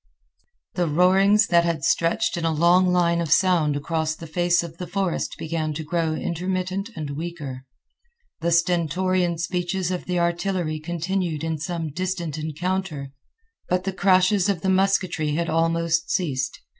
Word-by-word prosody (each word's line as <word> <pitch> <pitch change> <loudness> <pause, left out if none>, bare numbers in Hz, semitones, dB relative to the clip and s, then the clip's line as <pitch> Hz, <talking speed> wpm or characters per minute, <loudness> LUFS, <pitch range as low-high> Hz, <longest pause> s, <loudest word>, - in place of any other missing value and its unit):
The 175 -2 0
roarings 190 +6 +4
that 170 -3 +4
had 165 -4 -1
stretched 220 +7 +1
in 170 - -3
a 165 - +2
long 175 +4 +4
line 170 -1 +2
of 165 -3 -3
sound 170 -5 +3
across 155 +2 -1
the 165 - -10
face 175 +2 +1
of 165 -1 -9
the 180 - -5
forest 195 -4 -2
began 155 -1 -3
to 160 - -4
grow 165 0 -1
intermittent 185 +4 -2
and 150 -4 -5
weaker. 145 -4 -6 0.7
The 170 - 0
stentorian 175 +1 +1
speeches 180 +2 -2
of 180 - -3
the 180 -1 -1
artillery 170 -2 -1
continued 170 0 -2
in 160 -1 -2
some 165 -1 -3
distant 175 -2 -3
encounter, 155 -2 -3 0.6
but 180 0 +1
the 195 0 -2
crashes 185 +1 +3
of 185 -5 0
the 190 - 0
musketry 185 -5 +1
had 170 +1 -1
almost 165 0 +1
ceased. 140 -8 -1
170 Hz, 155 wpm, -23 LUFS, 160-185 Hz, 0.7 s, roarings